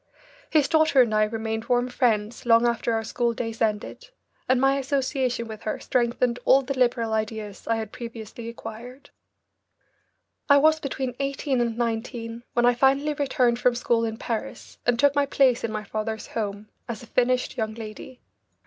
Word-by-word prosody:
His 300 Hz, -4 st, +3 dB
daughter 315 Hz, -5 st, +5 dB
and 225 Hz, -3 st, -2 dB
I 215 Hz, 0 st, +4 dB
remained 220 Hz, 0 st, -3 dB
warm 245 Hz, 0 st, +1 dB
friends 235 Hz, -2 st, 0 dB
long 230 Hz, 0 st, +5 dB
after 235 Hz, 0 st, 0 dB
our 225 Hz, 0 st, 0 dB
school 235 Hz, +1 st, -1 dB
days 225 Hz, -1 st, -5 dB
ended, 220 Hz, -, -2 dB, 0.4 s
and 255 Hz, -1 st, +4 dB
my 270 Hz, +1 st, +3 dB
association 260 Hz, -3 st, -1 dB
with 220 Hz, -1 st, -8 dB
her 215 Hz, -, -3 dB
strengthened 240 Hz, 0 st, 0 dB
all 270 Hz, +1 st, +5 dB
the 270 Hz, +2 st, -3 dB
liberal 240 Hz, -3 st, +1 dB
ideas 215 Hz, -2 st, -4 dB
I 230 Hz, -, +2 dB
had 220 Hz, -2 st, -4 dB
previously 230 Hz, -1 st, -8 dB
acquired. 240 Hz, +3 st, -10 dB, 1.4 s
I 285 Hz, -, +8 dB
was 315 Hz, +2 st, +4 dB
between 265 Hz, -3 st, -3 dB
eighteen 275 Hz, -1 st, -1 dB
and 235 Hz, -1 st, -1 dB
nineteen 230 Hz, 0 st, -3 dB
when 240 Hz, 0 st, +3 dB
I 245 Hz, -, +5 dB
finally 275 Hz, +4 st, +2 dB
returned 255 Hz, -4 st, +1 dB
from 245 Hz, -1 st, +3 dB
school 235 Hz, -1 st, +1 dB
in 225 Hz, -1 st, -2 dB
Paris 225 Hz, -2 st, -5 dB
and 245 Hz, -1 st, +3 dB
took 285 Hz, +3 st, +4 dB
my 285 Hz, -1 st, +2 dB
place 260 Hz, -3 st, +3 dB
in 230 Hz, -, -2 dB
my 215 Hz, -1 st, -3 dB
father's 220 Hz, +1 st, -4 dB
home 210 Hz, -1 st, -4 dB, 0.2 s
as 235 Hz, 0 st, -5 dB
a -, -, -9 dB
finished 250 Hz, +2 st, +1 dB
young 220 Hz, -2 st, -2 dB
lady. 225 Hz, +3 st, -9 dB
235 Hz, 175 wpm, -25 LUFS, 225-260 Hz, 1.4 s, I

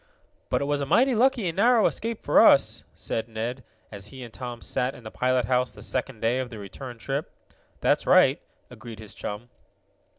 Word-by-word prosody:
"But -, -, +1 dB
it -, -, 0 dB
was 145 Hz, 0 st, 0 dB
a 140 Hz, -, -2 dB
mighty 260 Hz, -, +4 dB
lucky 245 Hz, -3 st, +2 dB
and 165 Hz, -, -3 dB
narrow 235 Hz, +2 st, +4 dB
escape 230 Hz, 0 st, -2 dB
for -, -, +5 dB
us," -, -, +4 dB
said 115 Hz, +1 st, -4 dB
Ned, 115 Hz, +3 st, -4 dB, 0.3 s
as 100 Hz, -1 st, -7 dB
he 130 Hz, +4 st, -10 dB
and 115 Hz, -2 st, -11 dB
Tom 120 Hz, -1 st, -6 dB
sat 125 Hz, +2 st, -2 dB
in 125 Hz, -, -13 dB
the 110 Hz, -, -8 dB
pilot 125 Hz, -1 st, +1 dB
house 125 Hz, 0 st, +1 dB
the -, -, -11 dB
second 130 Hz, -3 st, -2 dB
day 120 Hz, +3 st, +1 dB
of 130 Hz, -1 st, -3 dB
the 115 Hz, -, -9 dB
return 120 Hz, +5 st, -9 dB
trip. 135 Hz, +5 st, -3 dB, 0.5 s
"That's -, -, +1 dB
right," -, -, +5 dB, 0.3 s
agreed 115 Hz, -1 st, -10 dB
his 110 Hz, -1 st, -10 dB
chum. 105 Hz, +4 st, -7 dB
125 Hz, 200 wpm, -26 LUFS, 115-140 Hz, 0.5 s, for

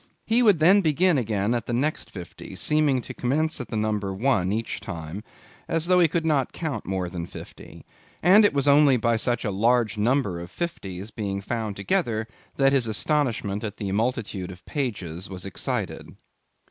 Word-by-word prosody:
He 230 Hz, +2 st, +3 dB
would 210 Hz, -7 st, +5 dB
then 185 Hz, +6 st, +6 dB
begin 165 Hz, -1 st, +3 dB
again 105 Hz, -2 st, 0 dB
at 120 Hz, -, -2 dB
the 120 Hz, -, -2 dB
next 145 Hz, +6 st, -1 dB
fifty; 90 Hz, -4 st, -9 dB
seeming 150 Hz, -5 st, +2 dB
to -, -, -7 dB
commence 155 Hz, +4 st, 0 dB
at 125 Hz, -, -9 dB
number 105 Hz, -3 st, -1 dB
one 95 Hz, -3 st, +1 dB
each 110 Hz, +2 st, -2 dB
time, 85 Hz, +1 st, -7 dB, 0.4 s
as 165 Hz, 0 st, 0 dB
though 180 Hz, +1 st, +4 dB
he 170 Hz, -, +6 dB
could 165 Hz, +1 st, -1 dB
not 145 Hz, -5 st, +1 dB
count 150 Hz, -10 st, -4 dB
more 95 Hz, -1 st, -1 dB
than 85 Hz, -1 st, -5 dB
fifty, -, -, -12 dB, 0.4 s
and 195 Hz, +6 st, +7 dB
it 205 Hz, -, +5 dB
was 140 Hz, 0 st, 0 dB
only 140 Hz, -2 st, +6 dB
by 115 Hz, 0 st, +1 dB
such 120 Hz, +2 st, -1 dB
a 105 Hz, -, 0 dB
large 115 Hz, +1 st, +2 dB
number 110 Hz, -5 st, +1 dB
of 85 Hz, 0 st, -8 dB
fifties 100 Hz, -, -5 dB
being 100 Hz, -2 st, -3 dB
found 110 Hz, 0 st, -3 dB
together, 110 Hz, -, 0 dB, 0.3 s
that 135 Hz, 0 st, +3 dB
his 130 Hz, -4 st, +2 dB
astonishment 110 Hz, -4 st, 0 dB
at 105 Hz, -1 st, -5 dB
the 100 Hz, -2 st, -3 dB
multitude 105 Hz, -4 st, -2 dB
of 90 Hz, 0 st, -14 dB
pages 95 Hz, -, -4 dB
was 95 Hz, -1 st, -6 dB
excited. 100 Hz, -, -3 dB
115 Hz, 180 wpm, -25 LUFS, 100-150 Hz, 0.4 s, and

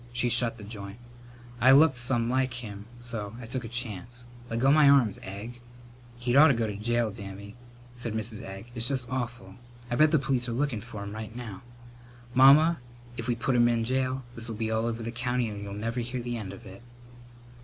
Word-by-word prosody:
She 120 Hz, 0 st, +1 dB
shut 115 Hz, -1 st, +2 dB
the 105 Hz, -, -10 dB
joint. 100 Hz, -1 st, -8 dB, 0.6 s
I 130 Hz, +2 st, +6 dB
looked 145 Hz, 0 st, +6 dB
some 120 Hz, -1 st, +1 dB
like 130 Hz, 0 st, 0 dB
him 105 Hz, -3 st, -7 dB
so 115 Hz, -3 st, -5 dB
I 125 Hz, -, -8 dB
took 125 Hz, +2 st, -3 dB
a -, -, -6 dB
chance. 120 Hz, 0 st, -4 dB, 0.2 s
Leggo 125 Hz, +5 st, +3 dB
my 150 Hz, -2 st, +6 dB
arms, 130 Hz, -8 st, +4 dB
Egg!" 110 Hz, +6 st, -8 dB, 0.6 s
"He'd 120 Hz, +1 st, -1 dB
ought 150 Hz, +3 st, +9 dB
to 140 Hz, -, +4 dB
go 115 Hz, -1 st, 0 dB
to 105 Hz, -2 st, -4 dB
jail, 120 Hz, +1 st, 0 dB
Dammy," 100 Hz, 0 st, -9 dB, 0.4 s
said 120 Hz, -2 st, -5 dB
Mrs. 110 Hz, -1 st, -3 dB
Egg. 95 Hz, +5 st, -9 dB
"It's 115 Hz, -1 st, +2 dB
just 130 Hz, -3 st, -1 dB
awful! 120 Hz, -1 st, -4 dB, 0.3 s
I -, -, +1 dB
bet 155 Hz, +4 st, +5 dB
the 155 Hz, -, +4 dB
police 130 Hz, -3 st, 0 dB
are -, -, -2 dB
lookin' 125 Hz, -3 st, -1 dB
for 110 Hz, -3 st, -8 dB
him 100 Hz, 0 st, -7 dB
right 110 Hz, +1 st, -7 dB
now." 115 Hz, -6 st, -7 dB, 0.7 s
"Mamma, 145 Hz, +6 st, +7 dB, 0.4 s
if 115 Hz, 0 st, -5 dB
we 120 Hz, -, +1 dB
put 125 Hz, +3 st, -1 dB
him 120 Hz, 0 st, +5 dB
in 115 Hz, -1 st, +1 dB
jail 130 Hz, +2 st, -1 dB
this'll 115 Hz, -1 st, -5 dB
be 110 Hz, 0 st, -2 dB
all 110 Hz, +1 st, 0 dB
over 115 Hz, 0 st, -3 dB
the 115 Hz, -, -4 dB
county 125 Hz, 0 st, -1 dB
and 105 Hz, -2 st, -6 dB
you'll 100 Hz, -1 st, -6 dB
never 115 Hz, +4 st, -3 dB
hear 120 Hz, +2 st, -3 dB
the 120 Hz, 0 st, -3 dB
end 105 Hz, -5 st, -5 dB
of 100 Hz, -, -11 dB
it." 95 Hz, +2 st, -11 dB
120 Hz, 210 wpm, -28 LUFS, 110-125 Hz, 0.7 s, ought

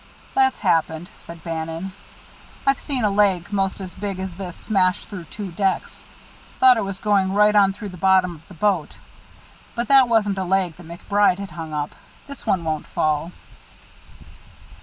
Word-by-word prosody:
"That's 265 Hz, -1 st, +2 dB
happened," 160 Hz, +1 st, 0 dB
said 170 Hz, -1 st, -12 dB
Bannon. 165 Hz, +2 st, -4 dB, 0.7 s
"I've 275 Hz, 0 st, +3 dB
seen 265 Hz, -5 st, -2 dB
a 210 Hz, -, +3 dB
leg 195 Hz, -2 st, +2 dB
most 195 Hz, -1 st, 0 dB
as 185 Hz, -2 st, -7 dB
big 200 Hz, -2 st, -4 dB
as 190 Hz, -1 st, -5 dB
this 180 Hz, -1 st, -7 dB
smash 185 Hz, -4 st, +1 dB
through 190 Hz, -5 st, -8 dB
two 200 Hz, +3 st, -7 dB
decks. 190 Hz, +2 st, -2 dB, 0.5 s
Thought 255 Hz, -2 st, +7 dB
it 220 Hz, -, 0 dB
was 195 Hz, -1 st, -4 dB
going 195 Hz, -2 st, +1 dB
right 210 Hz, +1 st, +4 dB
on 200 Hz, -1 st, +6 dB
through 205 Hz, +1 st, -7 dB
the 180 Hz, -, -10 dB
bottom 185 Hz, -1 st, +3 dB
of 160 Hz, -1 st, -16 dB
the 185 Hz, -, -13 dB
boat. 180 Hz, -2 st, 0 dB, 0.8 s
But 235 Hz, +2 st, -2 dB
that 270 Hz, -3 st, +6 dB
wasn't 205 Hz, -4 st, +2 dB
a -, -, 0 dB
leg 185 Hz, -2 st, 0 dB
that 175 Hz, -2 st, -13 dB
MacBride 190 Hz, +3 st, +1 dB
had 200 Hz, -2 st, -7 dB
hung 160 Hz, 0 st, -7 dB
up. 150 Hz, -1 st, -3 dB, 0.3 s
This 280 Hz, -1 st, -11 dB
one 185 Hz, -3 st, +1 dB
won't 155 Hz, -2 st, -3 dB
fall." 155 Hz, +2 st, 0 dB
190 Hz, 175 wpm, -22 LUFS, 170-205 Hz, 0.8 s, Thought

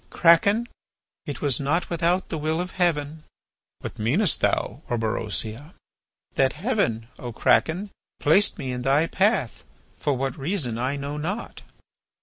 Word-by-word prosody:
"Kraken, 200 Hz, -, +4 dB, 0.6 s
it 145 Hz, -4 st, -5 dB
was 140 Hz, -4 st, +3 dB
not 150 Hz, +6 st, 0 dB
without 170 Hz, +2 st, +1 dB
the 160 Hz, -, -3 dB
will 155 Hz, +2 st, -1 dB
of 180 Hz, +1 st, -3 dB
Heaven." 160 Hz, -4 st, 0 dB, 0.6 s
"What -, -, -7 dB
meanest 150 Hz, -, +2 dB
thou, -, -, 0 dB
Orberosia?" 115 Hz, -, -2 dB, 0.6 s
"That 135 Hz, -1 st, +2 dB
Heaven, 150 Hz, -, -1 dB
O 120 Hz, -, -5 dB
Kraken, 180 Hz, -, +2 dB, 0.3 s
placed 190 Hz, +9 st, +3 dB
me 135 Hz, -6 st, -4 dB
in 125 Hz, 0 st, -3 dB
thy 135 Hz, +5 st, +3 dB
path, 190 Hz, -, +1 dB, 0.4 s
for 145 Hz, -3 st, 0 dB
what 135 Hz, +4 st, -3 dB
reason 135 Hz, -, 0 dB
I 130 Hz, +3 st, -1 dB
know 140 Hz, +1 st, -4 dB
not." 190 Hz, +10 st, -4 dB
150 Hz, 135 wpm, -25 LUFS, 130-180 Hz, 0.6 s, Kraken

